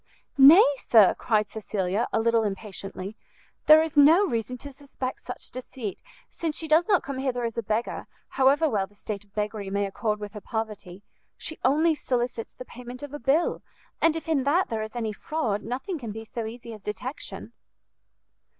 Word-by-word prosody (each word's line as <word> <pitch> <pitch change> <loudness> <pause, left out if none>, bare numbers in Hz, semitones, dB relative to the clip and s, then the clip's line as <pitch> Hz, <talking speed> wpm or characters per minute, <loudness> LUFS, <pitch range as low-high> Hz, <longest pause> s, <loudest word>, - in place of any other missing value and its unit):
"Nay, 295 +8 +9
sir," 215 -5 +6
cried 215 -2 +1
Cecilia, 205 0 -2
a - - +1
little 230 0 +3
impatiently, 195 -1 -5 0.5
"there 310 +1 +9
is 320 -1 -5
no 315 +7 +7
reason 240 - -2
to 285 +3 -8
suspect 270 -2 -6
such 250 - -8
deceit, 250 -4 -6 0.3
since 320 -3 -3
she 320 - -4
does 315 +3 +4
not 395 -4 +3
come 275 -1 -5
hither 255 -2 -1
as 230 -1 -2
a 230 - -1
beggar, 220 +2 -2 0.2
however 275 +4 +3
well 200 -8 0
the 205 - -26
state 205 -1 -6
of 205 0 -31
beggary 210 -1 -3
may 200 +1 0
accord 210 +2 -2
with 210 -1 -7
her 210 - -8
poverty: 210 -5 -5 0.3
she 315 - -6
only 310 +6 +4
solicits 245 -5 -2
the 255 - -9
payment 250 +2 -10
of 290 -1 -7
a 295 - -5
bill, 275 +8 +1 0.4
and 330 -1 +4
if 325 - -5
in 305 -5 +1
that 325 +7 +2
there 225 -1 -2
is 220 +2 -6
any 225 -3 -2
fraud, 220 -5 -2
nothing 265 - -4
can 230 -5 -6
be 225 +1 -7
so 225 0 -5
easy 235 0 -8
as 215 - -11
detection." 245 +7 -6
240 Hz, 185 wpm, -26 LUFS, 215-285 Hz, 0.5 s, Nay